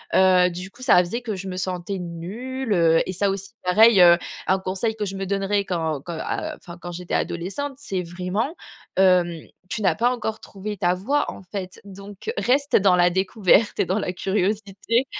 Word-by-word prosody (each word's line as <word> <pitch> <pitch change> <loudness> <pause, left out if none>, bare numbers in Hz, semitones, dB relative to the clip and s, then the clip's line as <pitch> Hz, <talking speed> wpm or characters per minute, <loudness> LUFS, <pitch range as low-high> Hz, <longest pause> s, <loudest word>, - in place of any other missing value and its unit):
Heu, 185 -1 +5
du 180 +2 -7
coup 245 - -18
ça 255 - +5
faisait 180 +7 -1
que 225 -4 -4
je 190 +1 -7
me 185 - -5
sentais 185 +1 -3
nulle, 215 +10 -5
heu, 165 -2 +4
et - - -3
ça 195 +2 0
aussi 195 +2 -4
pareil, 210 +4 +6
heu, 175 -1 +8 0.3
un 190 +1 +3
conseil 190 +4 -2
que 215 - -3
je 195 0 -5
me 195 - -3
donnerais 200 +1 0
quand 160 -6 -2
quand, 170 - -5
heu, - - -6
à - - -3
heu, - - -11
enfin, 170 0 -11
quand 175 0 -7
j'étais 175 +1 -6
adolescente, 200 +12 -2
c'est 195 -10 -3
vraiment, 180 - -3 0.4
hem: 180 -3 +3 0.2
«Tu 215 - -3
n'as 200 - +2
pas 235 +3 +2
encore 220 -2 -4
trouvé 205 +1 -7
ta 175 0 +2
voie, 270 +11 0
en - - -11
fait, 185 0 -7
donc 200 - -8
reste 280 +3 +2
dans 190 -2 +4
la 175 0 +4
découverte 190 +3 +2
et - - +3
dans 185 +3 0
la 180 - -3
curiosité». 205 +5 0
190 Hz, 205 wpm, -23 LUFS, 180-215 Hz, 0.4 s, heu